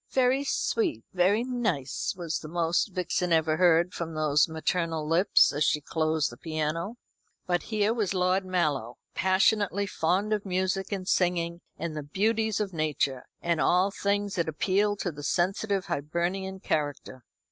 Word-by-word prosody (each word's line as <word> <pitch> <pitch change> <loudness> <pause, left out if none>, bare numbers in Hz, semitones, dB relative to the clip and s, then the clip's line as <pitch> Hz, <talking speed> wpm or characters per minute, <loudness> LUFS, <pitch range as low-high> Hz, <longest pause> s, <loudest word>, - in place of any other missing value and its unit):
"Very 260 +1 +2
sweet, 355 +5 -1
very 190 +5 +3
nice," 215 - -2
was 170 -3 -3
the 155 - -9
most 170 +3 +1
Vixen 180 -1 -1
ever 160 -1 +3
heard 175 0 +4
from 165 -2 -5
those 150 0 +3
maternal 160 -1 -1
lips 175 +5 +4
as 145 +1 +1
she 150 - +2
closed 155 -1 0
the 120 - -11
piano. 160 - -3 0.5
But 175 -1 0
here 215 0 +1
was 210 -5 -1
Lord 185 +1 +2
Mallow, 150 -10 -1 0.2
passionately 200 +1 +2
fond 190 +3 0
of 210 -1 -1
music 190 +1 -1
and 190 -2 -3
singing, 175 -2 +1 0.2
and 160 -1 -4
the 150 - -3
beauties 215 +8 0
of 200 -3 -2
nature, 150 -5 -1 0.2
and 170 -2 +1
all 185 +3 +3
things 200 0 -1
that 170 -2 0
appeal 200 +6 +1
to 190 -3 -3
the 145 -1 -9
sensitive 195 +5 0
Hibernian 175 +4 -2
character. 145 -6 -3
180 Hz, 155 wpm, -28 LUFS, 160-200 Hz, 0.5 s, heard